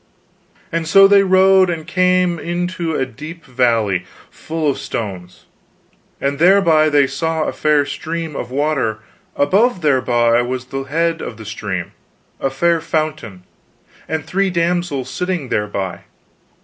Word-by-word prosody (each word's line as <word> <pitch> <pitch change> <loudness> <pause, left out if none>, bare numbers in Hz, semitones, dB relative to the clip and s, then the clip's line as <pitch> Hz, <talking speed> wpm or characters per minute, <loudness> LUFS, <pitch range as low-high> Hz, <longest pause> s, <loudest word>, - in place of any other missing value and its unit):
"And 165 -1 -2
so 195 +3 +7
they 200 0 +6
rode 190 0 +4
and 165 -2 -4
came 180 0 +1
into 175 0 -3
a 130 - 0
deep 155 +7 -10
valley 115 -8 +1 0.3
full 160 -1 -4
of 140 - 0
stones, 90 -5 -6 0.7
and 140 +1 -2
thereby 170 -4 +5
they 145 -2 +4
saw 160 +4 -2
a - - -3
fair 150 -2 +2
stream 160 +2 -5
of 120 - -5
water; 135 -5 0 0.4
above 195 - +2
thereby 120 -5 +2
was 125 +1 -4
the 135 +1 -5
head 165 +3 -1
of 115 - -6
the 110 - -10
stream, 100 -4 -5 0.5
a 135 - 0
fair 165 +5 +1
fountain, 155 - -3 0.6
and 160 -1 -3
three 195 +1 0
damsels 170 -6 -1
sitting 180 -2 -3
thereby. 100 -3 -2
155 Hz, 135 wpm, -18 LUFS, 125-170 Hz, 0.7 s, so